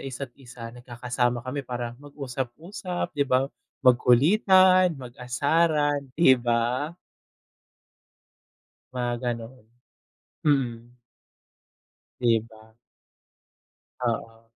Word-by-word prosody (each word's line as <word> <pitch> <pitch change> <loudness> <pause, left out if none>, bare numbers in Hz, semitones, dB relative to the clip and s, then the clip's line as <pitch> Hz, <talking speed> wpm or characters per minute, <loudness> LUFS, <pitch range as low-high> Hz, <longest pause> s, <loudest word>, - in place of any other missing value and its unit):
isa't 135 -1 -6
isa, 120 -2 -10
nagkakasama 120 0 -2
kami 130 +3 -3
para 120 -2 -5
mag-usap-usap 145 +6 -5
'di 140 -2 0
ba, 130 +1 +3 0.4
magkulitan, 180 - +5
mag-asaran 145 +4 +1 0.2
'di 130 -6 +5
ba? 120 +7 0 2.0
Mga 125 -1 -1
ganon, 115 -1 -3 0.9
mm. 120 -5 0 1.3
'Di 115 -2 +3
ba. 110 -1 -18 1.3
Oo. 115 -2 -3
125 Hz, 75 wpm, -26 LUFS, 120-145 Hz, 2.0 s, magkulitan